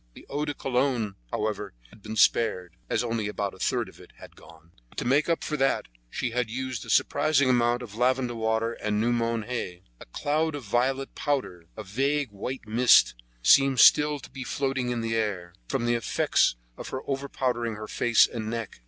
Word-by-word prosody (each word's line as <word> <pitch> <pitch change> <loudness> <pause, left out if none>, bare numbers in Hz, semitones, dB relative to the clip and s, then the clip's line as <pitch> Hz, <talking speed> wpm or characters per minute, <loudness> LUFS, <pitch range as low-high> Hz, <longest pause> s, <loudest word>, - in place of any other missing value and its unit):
The - - -13
eau 145 +2 -1
de 145 -1 -4
cologne, 125 -6 0 0.2
however, 105 - -3 0.2
had 110 - -18
been 110 +2 -7
spared, 90 -6 +2
as - - 0
only 115 -3 -2
about 100 -1 -3
a 95 - -15
third - - 0
of - - -15
it - - -16
had - - -14
gone; 80 +1 -17 0.2
but - - -23
to - - -3
make 145 +6 +2
up 165 - 0
for 150 - -2
that 135 0 +1 0.2
she 120 - -3
had 125 -1 -1
used 130 -1 -4
a - - -11
surprising 140 -4 +3
amount 120 0 +2
of 110 -4 -10
lavender 125 +1 +1
water 110 0 -1
and 105 -2 -2
new 115 +2 +1
mown 115 -1 0
hay. 95 -7 -5 0.2
A - - -12
cloud 155 - -1
of 145 - -6
violet 130 +5 0
powder, 130 - -2
a - - -5
vague 135 +5 -1
white 115 +4 -6
mist, 120 - +5 0.3
seemed 135 - +5
still 150 0 +6
to 140 - -13
be 135 - -7
floating 135 -1 -2
in 120 -1 -2
the 115 0 -2
air, 95 -6 -2
from 130 -4 -1
the 120 - +2
effects 115 - +1 0.2
of - - -7
her 130 - -4
over 140 0 -3
powdering 120 -3 -1
her 110 0 -7
face 120 +1 +4
and 110 -2 -5
neck. 115 - -5
120 Hz, 205 wpm, -26 LUFS, 110-135 Hz, 0.3 s, still